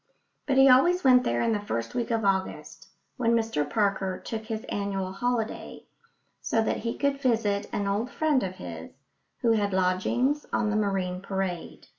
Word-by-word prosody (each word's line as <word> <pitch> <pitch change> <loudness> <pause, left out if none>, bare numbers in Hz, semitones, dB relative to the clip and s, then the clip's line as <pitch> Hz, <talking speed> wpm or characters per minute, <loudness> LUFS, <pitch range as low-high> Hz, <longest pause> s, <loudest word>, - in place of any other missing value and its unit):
But 270 -2 +1
he 270 0 +8
always 345 +8 +5
went 250 -2 +6
there 120 0 0
in - - +1
the 210 - +1
first 115 - -4
week 240 -2 -2
of 225 -2 0
August, 190 -2 -2 0.3
when 235 -2 +2
Mr 220 -11 0
Parker 195 -1 0
took 220 -1 -6
his 220 -1 -4
annual 200 -5 -3
holiday, 230 +2 -3 0.6
so 225 - +1
that - - 0
he 230 0 -4
could 280 -1 0
visit 220 -5 +1
an 205 - -2
old 210 +5 -1
friend 305 -4 +1
of 185 -1 -4
his, 85 - -8 0.5
who 235 - +3
had 205 -3 +1
lodgings 190 +10 +1
on 215 -2 +1
the - - 0
Marine 190 -3 -1
Parade. 190 -3 -4
210 Hz, 175 wpm, -27 LUFS, 190-245 Hz, 0.6 s, he